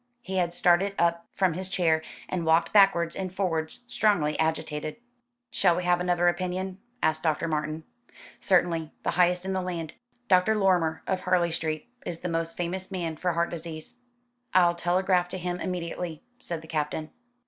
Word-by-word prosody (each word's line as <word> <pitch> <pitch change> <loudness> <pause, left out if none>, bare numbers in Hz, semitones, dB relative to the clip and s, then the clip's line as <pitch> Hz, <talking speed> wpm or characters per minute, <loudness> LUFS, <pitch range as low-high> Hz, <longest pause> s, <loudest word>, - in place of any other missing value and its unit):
He 190 -3 -3
had 175 -2 +1
started 180 +3 +3
up 170 0 +1
from 190 -4 +1
his 185 +3 -4
chair, 165 -4 +2 0.3
and 180 -2 -2
walked 160 +1 +3
backwards 185 -5 +5
and 185 -1 -3
forwards, 175 -3 -2
strongly 205 -11 +2
agitated. 155 -1 -1 0.6
"Shall 185 -7 +3
we 180 - -2
have 180 0 +3
another 175 -1 +2
opinion?" 185 +2 -1 0.2
asked 155 0 +2
Dr. 160 0 0
Martin. 155 0 -2 0.6
"Certainly. 170 -4 +2
The - - +1
highest 180 0 +2
in 190 - -1
the 190 - 0
land." 170 -3 -4 0.3
"Dr. 190 +2 +4
Lorrimer, 180 -6 +2
of 190 - 0
Harley 175 -2 +2
Street, 155 -2 -3 0.2
is 170 -1 -5
the 180 - -3
most 165 0 -2
famous 185 +2 -3
man 175 -4 -3
for 180 +2 -1
heart 170 +1 0
disease." 165 +4 -6 0.6
"I'll 175 -2 +6
telegraph 180 +1 +1
to 185 - -4
him 180 0 -3
immediately," 175 -3 -4 0.2
said 165 -2 -4
the - - -12
Captain. 155 0 -2
175 Hz, 170 wpm, -27 LUFS, 160-185 Hz, 0.6 s, I'll